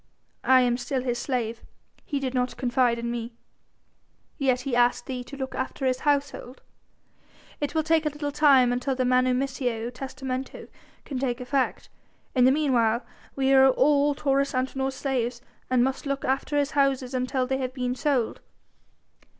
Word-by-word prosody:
I 260 0 +6
am 245 -1 +2
still 255 +1 -2
his 240 -2 -1
slave; 235 -4 -2 0.4
he 285 - -3
did 265 -2 -3
not 250 -1 -1
confide 245 -2 +1
in 235 0 -3
me." 235 0 -5 1.1
"Yet 260 -3 +2
he 255 -1 -2
asked 245 0 +2
thee 255 -2 -4
to 280 - -10
look 265 -1 -4
after 260 +1 -3
his 255 -1 +1
household." 280 -3 -1 1.0
"It 290 +2 -3
will 315 - +2
take 320 0 +2
a - - +2
little 295 0 -4
time 275 -4 +5
until 255 +2 -1
the 255 0 0
manumissio 255 -2 0
testamento 265 0 -6 0.4
can 270 -3 -4
take 250 -2 -1
effect. 260 +1 -1 0.5
In 250 -2 +4
the 260 - +6
meanwhile 250 -5 +1 0.3
we 270 0 +2
all 280 +2 +4
are - - -15
Taurus 275 -1 0
Antinor's 265 +1 -1
slaves 250 -3 -2 0.3
and 250 -1 +3
must 265 +2 -2
look 275 0 -2
after 270 +3 0
his 285 -1 +1
houses 275 -2 +1
until 255 0 0
they 265 +1 -1
have 255 0 -4
been 250 -1 -1
sold." 260 -3 0
260 Hz, 165 wpm, -26 LUFS, 250-275 Hz, 1.1 s, I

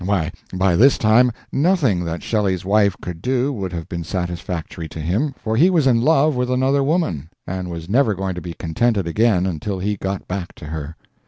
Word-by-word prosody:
Why, 90 -5 0 0.2
by 95 -1 +2
this 130 +9 +5
time, 115 +3 +4 0.2
nothing 140 - +2
that 85 0 -4
Shelley's 95 -5 0
wife 100 -1 +3
could 85 -2 -6
do 130 +3 0
would 95 -6 -4
have 85 -2 -5
been 85 -1 -4
satisfactory 85 -1 -4
to - - -8
him, 105 - -1
for 110 0 -2
he 165 +10 +5
was 165 -6 +2
in 120 -3 +4
love 155 +1 +3
with 125 0 -1
another 130 +2 +2
woman, 135 - -1 0.2
and 90 0 -4
was 85 -1 -6
never 110 0 +2
going 95 0 -2
to 90 - -6
be 85 0 -7
contented 100 +5 0
again 95 +1 +2
until 95 +2 -3
he 100 +2 -2
got 95 0 -4
back 90 -1 -5
to - - -10
her. 80 0 -6
95 Hz, 200 wpm, -20 LUFS, 85-125 Hz, 0.2 s, this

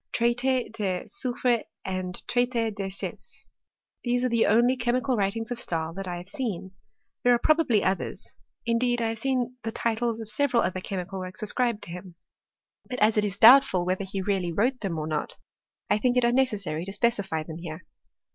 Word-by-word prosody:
Traiti 245 +1 +1
de 190 -5 -2
Soyfre 245 -2 0 0.2
and 185 -1 -4
TraitS 240 -2 +1
de 195 -1 -3
Sets. 190 - -8 0.5
These 245 0 +1
are 255 - +2
the 230 -1 +3
only 240 +4 +4
ehe* 240 -1 0
mical 255 +1 0
writings 225 +3 -1
of 240 - -2
Stahl 165 -6 -2
that 195 +1 -6
I 175 -1 -3
have 175 +1 -9
seen. 195 -5 -4 0.5
There 245 - +5
ar« - - +5
probably 280 -6 +3
others; 190 +1 -2 0.3
indeed 240 +1 +1
1 230 -1 0
have 225 0 -4
seen 255 0 -1
the 225 - -3
titles 230 0 -1
of 225 - -6
se 285 +7 +2
veral 245 -3 +2
other 185 0 -2
chemical 190 0 -4
works 185 +4 -7
ascribed 235 0 0
to - - -6
him. 180 0 -9 0.7
But 250 - -3
as 215 -1 +4
it 210 - +3
is 200 -1 -3
doubtful 230 -6 +7
whether 185 +2 0
he 190 0 -4
really 190 -3 0
wrote 245 +9 +1
them 190 -6 -3
or 155 - -2
not, 155 -1 -3 0.5
I - - +2
think 250 +2 +2
it 250 - +4
unnecessary 215 -10 +1
to 195 - -5
specify 200 -7 0
them 160 +1 -8
here. 165 -1 -7
220 Hz, 195 wpm, -27 LUFS, 185-245 Hz, 0.7 s, doubtful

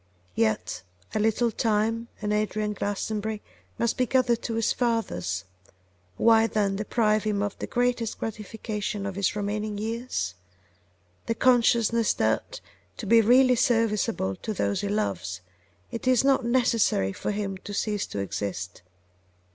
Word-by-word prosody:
Yet 110 -3 0 0.3
a - - 0
little 225 +2 +2
time 225 +1 0 0.2
and 210 0 0
Adrian 210 0 0
Glastonbury 210 +2 -2 0.4
must 235 -1 0
be 255 - +1
gathered 240 -2 +2
to 230 - -3
his 225 -1 +1
fathers. 95 - -1 0.7
Why, 225 -1 +5
then, 205 -3 0
deprive 215 0 +1
him 210 -2 0
of 205 -1 -2
the - - -4
greatest 245 -2 0
gratification 210 -1 -4
of 195 - -3
his 200 +1 0
remaining 210 0 -2
years? 220 - -3 0.9
the 230 - 0
consciousness 235 -2 +3
that, - - -1 0.4
to 230 - -6
be 230 +3 +6
really 250 +3 +5
serviceable 225 - +1
to 215 - -5
those 100 - 0
he 205 - -2
loves, 95 - -2 0.5
it 230 - -5
is 255 -2 +4
not 270 -1 +3
necessary 235 - +2
for - - -4
him 200 -2 -2
to 205 - -9
cease 205 0 -1
to - - -7
exist. 100 -1 -4
215 Hz, 140 wpm, -26 LUFS, 200-230 Hz, 0.9 s, be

